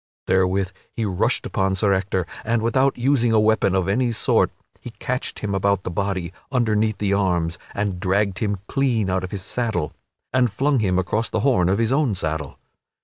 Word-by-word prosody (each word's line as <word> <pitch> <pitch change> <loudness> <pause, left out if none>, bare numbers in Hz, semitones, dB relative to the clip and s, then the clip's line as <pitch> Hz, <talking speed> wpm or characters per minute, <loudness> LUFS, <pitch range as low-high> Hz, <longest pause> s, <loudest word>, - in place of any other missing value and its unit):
Therewith 95 +1 +1 0.2
he 115 - -2
rushed 95 -3 0
upon 95 0 0
Sir 100 +1 +2
Ector, 95 -1 0 0.2
and 115 0 0
without 130 +4 +2
using 120 -2 +2
a 110 - +5
weapon 110 -3 +3
of 95 -1 +1
any 120 +5 +1
sort 115 - +2 0.3
he - - -8
catched 125 +1 -3
him 100 -2 -3
about 100 0 +1
the - - -4
body, 95 -1 -2 0.2
underneath 110 -4 +1
the 100 -1 0
arms, 90 -4 0 0.2
and 100 -3 -1
dragged 95 +1 +1
him 105 -2 0
clean 120 -8 +1
out 95 0 0
of 95 - -4
his 95 -2 -5
saddle, 110 -9 -2 0.4
and 125 -3 +3
flung 135 +5 +1
him 95 -4 +1
across 105 +5 0
the - - -1
horn 120 -11 +3
of 95 - +2
his 115 +1 +1
own 135 -6 +2
saddle. 80 -5 -3
100 Hz, 190 wpm, -22 LUFS, 95-115 Hz, 0.4 s, a